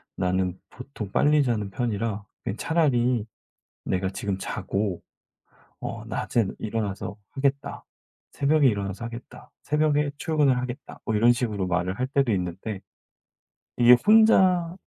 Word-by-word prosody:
나는 90 Hz, 0 st, -1 dB
보통 125 Hz, -6 st, -8 dB
빨리 150 Hz, +4 st, +4 dB
자는 110 Hz, -5 st, -1 dB
편이라 110 Hz, -2 st, -2 dB, 0.2 s
그냥 115 Hz, -2 st, -4 dB
차라리 125 Hz, -8 st, +1 dB, 0.6 s
내가 95 Hz, 0 st, -1 dB
지금 95 Hz, 0 st, -3 dB
자고 100 Hz, -2 st, -3 dB, 0.8 s
어 -, -, -6 dB
낮에는 115 Hz, -5 st, -1 dB
일어나서 105 Hz, -3 st, -3 dB
하겠다, 140 Hz, 0 st, -2 dB, 0.5 s
새벽에 145 Hz, -1 st, +3 dB
일어나서 100 Hz, 0 st, -3 dB
하겠다. 115 Hz, +1 st, -9 dB
새벽에 150 Hz, -1 st, +1 dB
출근을 150 Hz, -6 st, +2 dB
하겠다." 125 Hz, +3 st, -6 dB
뭐 110 Hz, -, -1 dB
이런 115 Hz, +3 st, +5 dB
식으로 105 Hz, -6 st, -2 dB
말을 90 Hz, +2 st, -1 dB
할 130 Hz, -, 0 dB
때도 135 Hz, -4 st, +1 dB
있는데 95 Hz, +2 st, -3 dB, 1.0 s
이게 120 Hz, 0 st, +8 dB
혼자 190 Hz, -5 st, +5 dB
120 Hz, 280 characters per minute, -25 LUFS, 100-140 Hz, 1.0 s, 이게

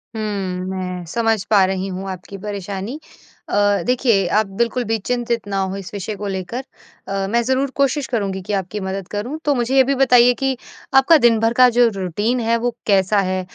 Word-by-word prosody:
हुँ। 220 Hz, -, -3 dB, 0.5 s
मैं 185 Hz, -1 st, -4 dB
समझ 225 Hz, +1 st, 0 dB
पा 205 Hz, -3 st, +5 dB
रही 190 Hz, 0 st, -2 dB
हूँ 190 Hz, +1 st, -5 dB
आपकी 190 Hz, +2 st, -8 dB
परेशानी। 200 Hz, -, -5 dB, 0.5 s
अ, -, -, -1 dB, 0.3 s
देखिए 240 Hz, -6 st, +2 dB
आप 215 Hz, -, +3 dB
बिल्कुल 235 Hz, +1 st, +1 dB
भी 225 Hz, 0 st, -1 dB
चिंतित 235 Hz, 0 st, -2 dB
ना 200 Hz, -1 st, -2 dB
हो 190 Hz, 0 st, -2 dB
इस 195 Hz, +1 st, -9 dB
विषय 205 Hz, +1 st, -4 dB
को 205 Hz, +1 st, -5 dB
लेकर 195 Hz, +7 st, -4 dB, 0.4 s
अ, 195 Hz, 0 st, -2 dB
मैं 235 Hz, +3 st, +2 dB
ज़रूर 265 Hz, +2 st, 0 dB
कोशिश 280 Hz, 0 st, +1 dB
करूँगी 200 Hz, -5 st, -2 dB
कि 205 Hz, +3 st, -5 dB
आपकी 195 Hz, +2 st, -2 dB
मदद 190 Hz, -1 st, -4 dB
करूँ। 235 Hz, +9 st, -4 dB
तो 290 Hz, -, +3 dB
मुझे 245 Hz, +2 st, 0 dB
ये 265 Hz, -, +7 dB
भी 275 Hz, +2 st, 0 dB
बताइए 250 Hz, -2 st, +5 dB
कि 270 Hz, -1 st, +1 dB, 0.4 s
आपका 270 Hz, +5 st, +7 dB
दिन 235 Hz, -4 st, +4 dB
भर 225 Hz, +1 st, +2 dB
का 250 Hz, 0 st, +6 dB
जो 240 Hz, -1 st, +6 dB
रूटीन 205 Hz, +6 st, -1 dB
है 230 Hz, 0 st, +1 dB
वो 240 Hz, 0 st, -2 dB
कैसा 200 Hz, +1 st, +3 dB
है? 185 Hz, -1 st, 0 dB
215 Hz, 200 wpm, -20 LUFS, 195-245 Hz, 0.5 s, ये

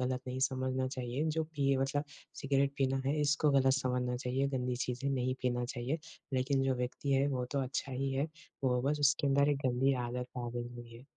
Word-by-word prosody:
गलत 125 Hz, 0 st, 0 dB
नहीं 130 Hz, +1 st, -3 dB
समझना 130 Hz, 0 st, -1 dB
चाहिए। 130 Hz, +2 st, -2 dB
जो 160 Hz, 0 st, 0 dB
पिए 140 Hz, -2 st, +2 dB
मतलब 140 Hz, +2 st, 0 dB, 0.4 s
सिगरेट 140 Hz, 0 st, +2 dB
पीना 135 Hz, 0 st, +2 dB
है, 145 Hz, +3 st, +1 dB
इसको 150 Hz, +1 st, +3 dB
गलत 135 Hz, -1 st, +4 dB
समझना 125 Hz, -2 st, 0 dB
चाहिए, 130 Hz, +2 st, 0 dB
गंदी 125 Hz, -2 st, -1 dB
चीज़ें 125 Hz, +2 st, -2 dB
नहीं 130 Hz, -1 st, 0 dB
पीना 125 Hz, -1 st, +1 dB
चाहिए। 125 Hz, +5 st, -2 dB, 0.3 s
लेकिन 135 Hz, +1 st, +2 dB
जो 135 Hz, -1 st, +2 dB
व्यक्ति 125 Hz, +3 st, -2 dB
है 135 Hz, +1 st, +4 dB
वो 125 Hz, -2 st, -1 dB
तो 140 Hz, -, +1 dB
अच्छा 135 Hz, +1 st, -3 dB
ही 135 Hz, +1 st, -1 dB
है, 135 Hz, +3 st, +1 dB, 0.4 s
वो 125 Hz, -1 st, +3 dB
बस 145 Hz, +2 st, 0 dB
उसके 145 Hz, +1 st, +3 dB
अंदर 140 Hz, +1 st, +4 dB
एक 145 Hz, -, +2 dB
गंदी 130 Hz, +2 st, +3 dB
आदत 125 Hz, +1 st, -3 dB
आ 120 Hz, -1 st, -3 dB
गई 120 Hz, 0 st, -4 dB
हुई 120 Hz, -1 st, -10 dB
है। 120 Hz, -, -14 dB
130 Hz, 210 wpm, -33 LUFS, 125-140 Hz, 0.4 s, गलत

